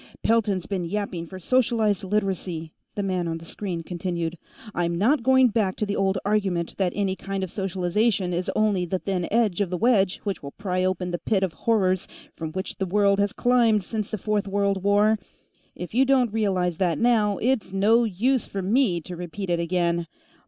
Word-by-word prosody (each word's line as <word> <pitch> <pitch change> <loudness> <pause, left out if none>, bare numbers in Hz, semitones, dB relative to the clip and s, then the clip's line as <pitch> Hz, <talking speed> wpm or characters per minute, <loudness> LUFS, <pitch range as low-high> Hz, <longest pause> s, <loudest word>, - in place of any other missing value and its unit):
"Pelton's 205 -5 +2
been 190 -3 -2
yapping 180 -2 -3
for 190 - -9
socialized 220 -1 +1
Literacy," 185 -5 -2 0.2
the 205 - -2
man 185 -3 -1
on 165 0 -2
the 165 - -11
screen 175 -1 -4
continued. 175 -1 -3 0.4
"I'm 170 -1 -1
not 245 - +3
going 260 0 +5
back 205 -4 0
to 215 - -1
the 205 0 -2
old 195 0 +1
argument 195 -5 0
that 185 -3 +1
any 195 -2 0
kind 195 0 -4
of 185 - -4
socialization 190 0 0
is 180 +3 -2
only 210 -4 +2
the 185 +2 -1
thin 185 -2 -2
edge 210 -4 +2
of 195 - 0
the 180 - -2
wedge 200 -3 +3
which 200 -2 -3
will 140 0 -8
pry 185 -2 -2
open 185 -1 -1
the 175 - -2
pit 195 -3 0
of 185 -4 -1
horrors 190 -5 +1 0.3
from 160 -1 -5
which 190 +2 -4
the 190 - -1
world 200 +1 +3
has 200 0 +2
climbed 235 -4 +3
since 215 +1 -4
the 215 - -3
Fourth 210 0 -1
World 200 -1 0
War. 205 +2 +3 0.6
If 180 - -7
you 255 +3 +4
don't 255 -5 +2
realize 185 -6 0
that 175 -4 +1
now, 220 -4 +2
it's 245 -4 0
no 215 +5 +4
use 230 +4 0
for 195 -1 -4
me 200 -4 +2
to 175 +3 -8
repeat 180 +2 -5
it 170 - +1
again. 170 0 0
195 Hz, 195 wpm, -25 LUFS, 180-215 Hz, 0.6 s, going